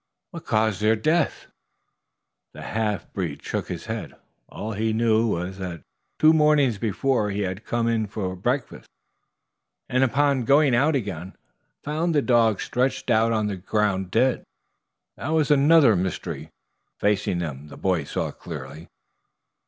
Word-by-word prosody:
"What - - -9
caused 110 -2 +1
their 110 +1 +4
death?" 155 +9 0 1.1
The - - -9
half 110 -2 -3
breed 85 -7 -4
shook - - -3
his - - -6
head. - - -5 0.3
All 110 - -6
he 110 +1 -1
knew 115 0 +2
was 95 -1 -3
that 90 -3 -6 0.3
two 155 +1 +6
mornings 150 -8 +3
before 110 0 0
he 100 +1 -2
had 95 +1 -4
come 115 0 -1
in 115 -2 0
for 95 -3 -4
breakfast, 125 +9 -3 1.0
and 130 +1 +2
upon 135 0 +2
going 140 +1 +4
out 145 +6 +3
again 95 -7 -4 0.5
found 155 +3 -1
the 145 - +3
dogs 115 -4 +3
stretched 130 0 -1
out 115 0 +3
on 110 -2 +1
the 100 -2 -3
ground 95 0 -1
dead. 120 +6 +2 0.8
That - - -7
there 155 - -1
was 155 -2 +2
another 145 -4 +6
mystery 90 -1 -3 0.5
facing 105 -3 +1
them 75 -4 -5
the - - -12
boys 90 -7 -1
saw - - -2
clearly. 80 +2 -9
110 Hz, 150 wpm, -24 LUFS, 95-130 Hz, 1.1 s, two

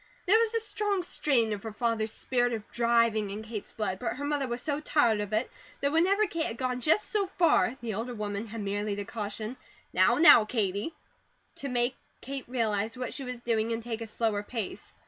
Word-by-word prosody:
There 420 +5 +6
was 460 0 +1
a - - +3
strong 415 -3 -1
strain 240 -10 +2
of 205 - -5
her 225 - -6
father's 225 -1 -1
spirit 245 0 0
of 220 -2 -5
driving 230 -3 +2
in 205 +2 -5
Kate's 220 -2 -6
blood; 195 -4 -3
but 245 - -2
her 285 +2 -4
mother 290 -2 0
was 240 0 -3
so 290 -1 -1
tired 240 -8 +2
of 205 0 -5
it 220 +4 0 0.3
that 280 0 +1
whenever 380 +7 +3
Kate 330 -4 -2
had 230 - -5
gone 250 -1 -2
just 320 - +3
so 410 -2 0
far 335 -9 +2
the 230 -2 -3
older 235 +4 -4
woman 210 0 -3
had 220 +1 -6
merely 205 +1 -2
to 205 0 -4
caution: 215 +2 -5 0.4
"Now, - - +4
now, 300 -7 +9
Katie!" 210 - -1 0.6
to 280 - -4
make 245 0 +1 0.2
Kate 275 -1 -6
realized 225 -2 -1
what 250 -1 -4
she 275 - -4
was 250 -2 -5
doing 230 -1 0
and 230 0 -4
take 230 -1 -4
a 225 - -5
slower 215 -1 -1
pace. 215 -1 -5
235 Hz, 210 wpm, -29 LUFS, 215-280 Hz, 0.6 s, now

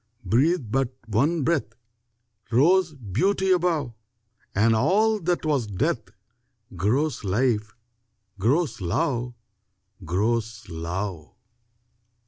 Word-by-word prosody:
Breathe 130 - +2
but 130 0 0
one 140 +9 +1
breath 135 -8 0 0.8
Rose 165 +6 +4
beauty 185 - 0
above, 170 -8 +1 0.6
And 110 +3 +4
all 210 - +3
that 175 -2 -1
was 140 -7 +1
death 115 - -1 0.7
Grows 125 - 0
life, 105 +1 0 0.6
grows 135 - +1
love, 120 +6 -1 0.7
Grows 110 +5 -1
love! 85 0 -5
125 Hz, 90 wpm, -25 LUFS, 105-160 Hz, 0.8 s, Rose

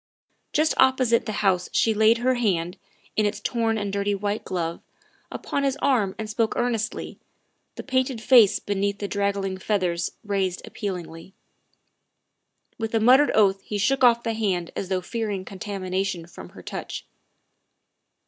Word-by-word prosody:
Just 310 +1 +2
opposite 260 -3 +3
the - - -1
house 180 -2 +2
she 225 - +2
laid 220 +2 +4
her 255 +2 +2
hand, 185 -8 -1 0.4
in 215 -1 +2
its 205 0 -3
torn 225 0 0
and 205 -2 -3
dirty 200 0 0
white 205 +1 -2
glove, 170 -2 -3 0.5
upon 280 - -3
his 275 0 0
arm 230 -10 +1
and 220 - -4
spoke 220 +1 -1
earnestly, 235 -3 -2 0.6
the - - -7
painted 260 -2 0
face 235 -3 +6
beneath 200 0 -2
the 200 - -4
draggled 200 -2 -2
feathers 180 -5 0
raised 195 -3 -2
appealingly. 180 -2 -6 1.4
With 225 0 -2
a - - +4
muttered 260 +6 +6
oath 195 -2 +4
he 210 - -4
shook 265 +6 +1
off 235 -1 +5
the 230 - -1
hand 190 -6 -1
as 190 - -4
though 185 -1 0
fearing 205 -1 -3
contamination 190 -3 -3
from 90 - -11
her - - -11
touch. - - -6
205 Hz, 150 wpm, -24 LUFS, 190-230 Hz, 1.4 s, face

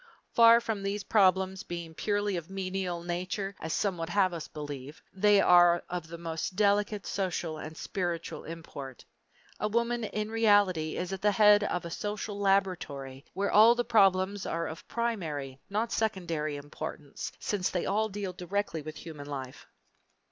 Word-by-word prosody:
Far 230 0 +8
from 225 -3 -3
these 200 +1 -2
problems 190 -2 +3
being 170 -2 -6
purely 205 +2 0
of 170 -1 -5
a - - -14
menial 185 -2 -3
nature, 185 +3 -3
as 160 - -5
some 190 0 0
would 165 0 -3
have 185 0 +2
us 165 -3 -5
believe, 145 -1 -7
they 205 +1 +4
are 175 -2 +6
of 175 -2 -4
the 170 +1 -8
most 165 +2 -4
delicate 205 0 +2
social 175 -5 -2
and 155 +1 -8
spiritual 175 -3 -3
import. 145 -5 -8 0.5
A 210 - 0
woman 235 +2 0
in 215 +1 -3
reality 205 -8 +3
is 180 +1 -3
at 190 - -5
the 210 0 +3
head 210 0 +6
of 180 -3 -2
a 170 - -6
social 205 +1 -4
laboratory 175 -9 0
where 200 +1 0
all 225 +3 +7
the 240 0 -1
problems 195 -3 +3
are 165 0 -1
of 160 0 -8
primary, 160 - -3
not 220 +3 -1
secondary, 170 -9 -1
importance, 145 0 -6
since 195 -3 -1
they 180 - -2
all 215 +2 +1
deal 195 -2 -4
directly 180 -2 -2
with 155 +1 -8
human 150 -3 -9
life. 135 -3 -7
185 Hz, 165 wpm, -30 LUFS, 165-205 Hz, 0.5 s, Far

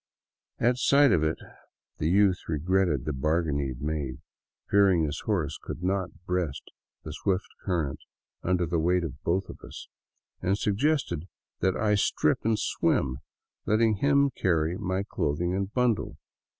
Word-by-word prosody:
At 125 +1 +2
sight 140 0 +5
of 80 - +3
it 80 0 0 0.6
the 75 - +1
youth 95 0 +4
regretted 85 -3 +1
the 75 - -1
bargain 75 +2 0
he 70 - -1
had 65 +1 -7
made, 75 -4 -2 0.5
fearing 95 -4 +4
his 75 -2 -2
horse 90 -9 -1
could 85 - -7
not 95 -2 -2
breast 90 -6 -2 0.3
the 75 - -6
swift 95 +3 -1 0.2
current 85 -7 -1 0.4
under 90 -1 +1
the 85 0 0
weight 90 +2 +2
of 80 -6 -6
both 95 +3 0
of - - -10
us, - - -9 0.5
and 95 +2 +1
suggested 105 - 0 0.3
that 95 +1 +1
I 105 -1 +2
strip 100 - +2
and 110 -1 +2
swim, 65 -9 0 0.5
letting 110 0 +3
him 140 +2 +3
carry 85 -6 +1
my 95 -1 -2
clothing 85 +3 -1
and 95 +1 -2
bundle. 125 -2 0
90 Hz, 150 wpm, -27 LUFS, 80-100 Hz, 0.6 s, sight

